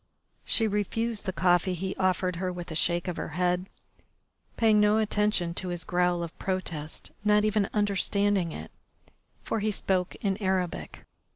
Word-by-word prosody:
She 225 - +2
refused 210 +2 -1
the - - +1
coffee 180 0 +2
he 190 +2 -3
offered 185 -1 +1
her 185 +1 -1
with 175 -1 -7
a - - -4
shake 170 +3 +1
of 180 - -3
her - - -3
head, 180 +1 +1 0.9
paying 220 -2 +5
no 210 +1 +4
attention 210 -5 +1
to 185 - -5
his 175 -2 -3
growl 180 0 +1
of 170 - -7
protest, 170 -5 -4
not 210 0 +4
even 210 -2 +1
understanding 200 -3 +1
it, - - -8 0.7
for 225 - -1
he 215 +1 0
spoke 190 -3 0
in 195 -2 -1
Arabic. 190 -4 -2
190 Hz, 160 wpm, -28 LUFS, 180-210 Hz, 0.9 s, paying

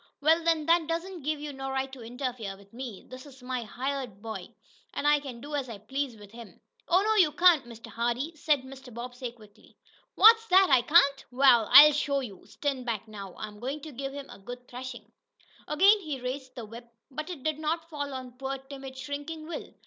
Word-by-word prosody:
"Wa'al, 320 +3 +3
then 325 -2 +2
that 335 -1 +3
don't 335 +2 -3
give 300 +1 -2
you 295 -1 -6
no 270 0 -5
right 265 0 -2
to 265 -2 -10
interfere 235 -4 -5
with 200 +1 -20
me! 240 -5 -7
This 255 +3 -10
is 265 -2 -15
my 250 -1 -3
hired 255 -2 -4
boy, 220 +1 -6 0.5
an' - - -3
I 295 0 +5
can 265 -4 -8
do 290 +2 -8
as 275 -3 -2
I 225 - -6
please 255 +4 -4
with 205 -1 -14
him." 230 -1 -12 0.3
"Oh, 365 +3 +4
no, 435 +1 +2
you 350 -7 +5
can't, 325 -3 +5
Mr. 230 -1 -11
Hardee!" 240 +7 -2
said 295 -3 +1
Mr. 265 -1 -11
Bobbsey 245 +1 -6
quickly. 215 -2 -20 0.4
"What's 450 0 +7
that? 380 0 +6
I 255 - +6
can't? 280 0 +4
Wa'al, 245 -4 +5
I'll 300 +1 +11
show 280 -1 0
you! 205 -8 -9
Stand 275 -3 -3
back 225 -3 -3
now, 200 -3 -9
I'm 210 -1 -7
goin' 270 +6 -4
to 310 - -8
give 270 +1 -5
him 280 0 -7
a - - -12
good 245 +5 -9
threshin'!" 245 -3 -8 0.6
Again 390 +8 +5
he 305 -8 -5
raised 255 +1 -5
the 235 - -6
whip, 235 +2 -12 0.2
but 305 +4 -5
it 325 -8 -7
did 310 -1 -1
not 325 +2 -2
fall 285 -2 -4
on 255 -1 -8
poor, 270 0 -3
timid, 270 0 -10
shrinking 290 +3 -6
Will. 340 - -6
270 Hz, 210 wpm, -28 LUFS, 240-300 Hz, 0.6 s, I'll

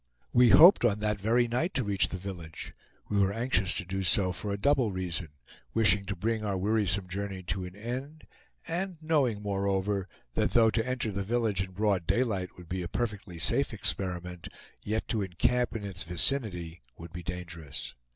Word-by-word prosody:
We 120 0 +6
hoped 170 - +8
on 105 -3 +2
that 105 -1 -1
very 120 +3 +3
night 130 +10 -1
to 130 - +1
reach 100 -2 +1
the 95 - -4
village. 90 -4 -8 0.3
We 100 - 0
were 100 0 +3
anxious 110 -4 +1
to 100 - -1
do 95 +2 -3
so 95 +1 +3
for 100 +3 -4
a 100 - -1
double 130 0 +2
reason, 90 -3 -2 0.5
wishing 105 -3 +4
to 100 - -3
bring 110 +4 -1
our 100 -2 -1
wearisome 100 -1 +1
journey 95 0 -5
to 90 +1 -3
an 90 +1 -9
end, 130 +8 -6 0.4
and 180 +1 -3
knowing, 140 -10 +1
moreover, 100 -1 -1 0.3
that - - 0
though 115 -2 +5
to 115 +2 0
enter 125 -4 -1
the 100 0 -3
village 110 -2 0
in 95 -1 -5
broad 100 -4 0
daylight 100 -7 0
would 90 -2 -12
be 90 +1 -3
a 85 - -3
perfectly 105 -5 -4
safe - - +2
experiment, 90 -2 -2 0.4
yet 110 +2 -2
to 110 - 0
encamp 115 +7 0
in 110 - -4
its 95 -1 -5
vicinity 90 - 0 0.2
would 85 0 -10
be 85 - -6
dangerous. 85 -4 -6
100 Hz, 185 wpm, -29 LUFS, 90-115 Hz, 0.5 s, hoped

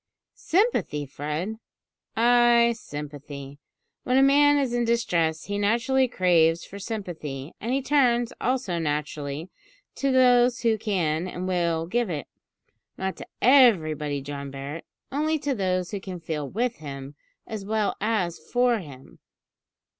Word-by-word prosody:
"Sympathy, 350 - 0
Fred?" 150 +10 -4 0.6
"Ay, 235 0 +5
sympathy. 145 - -8 0.4
When 250 +1 +2
a 270 - +6
man 290 +1 +5
is 270 -4 0
in 240 0 +1
distress 170 -9 +1
he 205 0 -3
naturally 240 +6 +2
craves 170 -6 +2
for 200 - -10
sympathy, 170 - -6
and 230 - -3
he 270 +1 0
turns, 245 -5 +2
also 245 -9 0
naturally, 150 +1 -3 0.5
to 275 -1 +1
those 250 -1 +4
who 225 -2 +2
can 180 -6 -1
and 185 0 -5
will 170 -3 0
give 235 +5 -1
it 150 -4 -3 0.7
not 190 0 -3
to - - -9 0.2
everybody, 155 - +4
John 140 0 -6
Barret 140 +4 -7 0.3
only 310 +3 0
to 285 -1 -2
those 185 -5 -1
who 200 - -3
can 185 -2 -7
feel 155 -4 -4
with 240 +3 -1
him 140 -2 -8 0.3
as 215 -3 -6
well 215 0 0
as 205 -6 0
for 245 +6 +1
him. 140 -7 -12
190 Hz, 140 wpm, -25 LUFS, 155-240 Hz, 0.7 s, a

